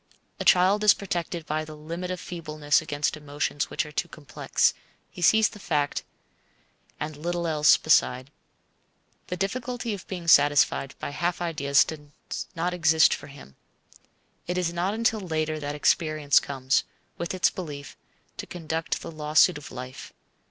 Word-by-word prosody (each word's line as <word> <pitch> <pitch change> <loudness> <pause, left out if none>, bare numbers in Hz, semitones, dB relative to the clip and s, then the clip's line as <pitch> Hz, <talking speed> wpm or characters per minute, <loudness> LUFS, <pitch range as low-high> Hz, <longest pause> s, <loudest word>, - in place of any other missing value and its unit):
A - - -2
child 190 +4 +4
is 210 -1 +7
protected 175 -3 -4
by 155 0 -2
the 155 0 -10
limit 170 +4 -6
of 185 -1 -3
feebleness 155 -4 -1
against 145 +1 -2
emotions 145 -1 -3
which - - -1
are 150 - -10
too 150 - -2
complex. 155 -3 0 0.4
He - - -10
sees 220 +5 +5
the 210 - -13
fact, 145 -6 -1 1.0
and 150 0 -4
little 170 +3 -3
else 150 -2 +5
beside. 130 +2 +2 1.0
The 180 - -4
difficulty 240 +4 -3
of 195 - -8
being 175 -3 -6
satisfied 145 -3 +4
by - - -5
half 170 +4 -1
ideas 145 -5 +3
does 150 -2 -8
not 175 +2 -1
exist 160 -2 +4
for - - -6
him. 140 - -14 0.9
It 180 +1 -2
is 175 -2 0
not 180 +4 -1
until 225 -1 +1
later 155 -4 -2
that 145 0 -4
experience 155 -1 +3
comes, 135 -2 0 0.4
with 170 +2 -3
its 185 - +3
brief, 145 -6 -7 0.4
to - - -6
conduct 165 -1 -3
the - - -7
lawsuit 155 +1 +3
of 145 - -11
life. 130 +1 -8
160 Hz, 155 wpm, -26 LUFS, 145-180 Hz, 1.0 s, is